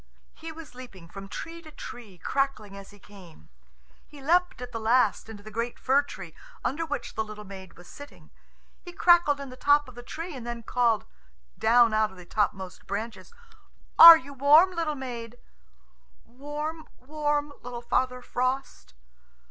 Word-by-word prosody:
He 325 0 -9
was 320 -3 -12
leaping 240 -9 -12
from 195 +3 -10
tree 335 - -7
to 315 - -13
tree, 230 -9 -11
crackling 215 -2 -2
as 195 0 -11
he 205 - -16
came. 185 - -16 0.6
He 295 - -14
leapt 350 +4 +1
at 250 0 -8
last 225 -1 +1
into 205 -2 -10
the 215 - -11
great 230 +3 -3
fir 270 +2 +3
tree, 190 - -10 0.3
under 325 +5 -2
which 290 -2 -5
the 220 - -2
little 215 -1 -10
maid 190 -3 -11
was 175 - -15
sitting. 285 0 -14 0.5
He 350 - -10
crackled 345 -6 +4
in 280 -1 -7
the 255 - -10
top 290 +2 +3
of 255 - -12
the 245 - -10
tree, 325 +6 -7
and 250 - -8
then 235 0 -6
called; 235 -2 +1 0.5
down 235 0 +4
out 215 0 +2
of 190 - -16
the 180 - -12
topmost 190 -1 -3
branches, 220 - -5 0.7
"Are 335 0 +13
you 280 0 -11
warm, 295 +7 +5
little 330 -4 -2
maid?" 240 -3 -7 0.9
"Warm, 295 +5 -6
warm, 295 +1 -2
little 240 0 -8
Father 250 +1 -1
Frost." 255 - -3
250 Hz, 165 wpm, -27 LUFS, 215-295 Hz, 0.9 s, Are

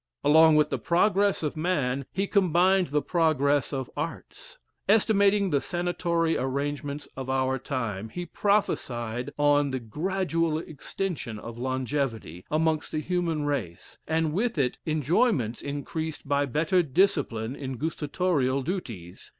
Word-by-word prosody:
Along 160 +2 +6
with 150 0 +3
the - - -1
progress 200 +2 +2
of 150 - -2
man 140 -6 -1
he 195 +1 -1
combined 185 -1 +3
the 145 +1 0
progress 145 -5 +2
of 135 -3 -3
arts 335 - -6 0.3
estimating 200 -2 +4
the 140 - +2
sanatory 175 -2 0
arrangements 140 +2 -3
of 130 0 -6
our 130 0 +1
time, 115 -6 -3
he 175 +8 -5
prophecied 125 - -1
on 145 -1 +3
the 130 -1 -2
gradual 165 - -1
extension 155 - -5
of 115 +2 -8
longevity, 130 - -2
amongst 160 0 0
the 155 - -1
human 165 -2 -1
race; 115 -13 -4
and 160 -1 0
with 220 +2 0
it, 130 -4 0
enjoyments 155 - +1
increased 145 +2 -5
by 140 0 +1
better 165 +7 +2
discipline 140 - +1
in 135 -3 -5
gustatorial 150 -2 0
duties. 115 - -6
150 Hz, 130 wpm, -27 LUFS, 130-175 Hz, 0.3 s, Along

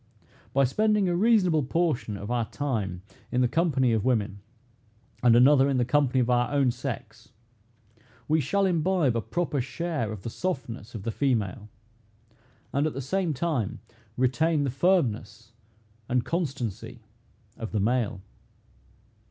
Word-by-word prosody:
By 140 - +3
spending 210 - +2
a 175 - +1
reasonable 185 -6 +3
portion 140 -7 -1
of 100 +4 -6
our 120 -2 +1
time 105 -11 -3 0.3
in 125 - +1
the 125 - +4
company 135 -4 +2
of 110 -3 +1
women, 105 -5 0 0.8
and 120 -2 +5
another 135 +2 +6
in 135 - +1
the 125 - +2
company 130 0 +2
of 120 - +2
our 120 0 +2
own 140 -3 +3
sex, 115 -3 -7 1.0
we 155 +1 +2
shall 195 +9 +1
imbibe 170 -6 +1
a 115 - 0
proper 160 0 -2
share 150 -4 -3
of 105 -3 -8
the 115 - -5
softness 120 - -4
of 105 - -6
the 115 - -2
female, 110 -6 -1 1.0
and 140 +3 +2
at 155 - -3
the 135 - -5
same 160 +4 -1
time 135 - -1 0.4
retain 145 +5 +2
the 135 - -1
firmness 115 - 0 0.6
and 125 -1 +1
constancy 125 - -4 0.5
of 115 - -6
the 110 - 0
male. 110 -2 0
130 Hz, 145 wpm, -27 LUFS, 115-160 Hz, 1.0 s, another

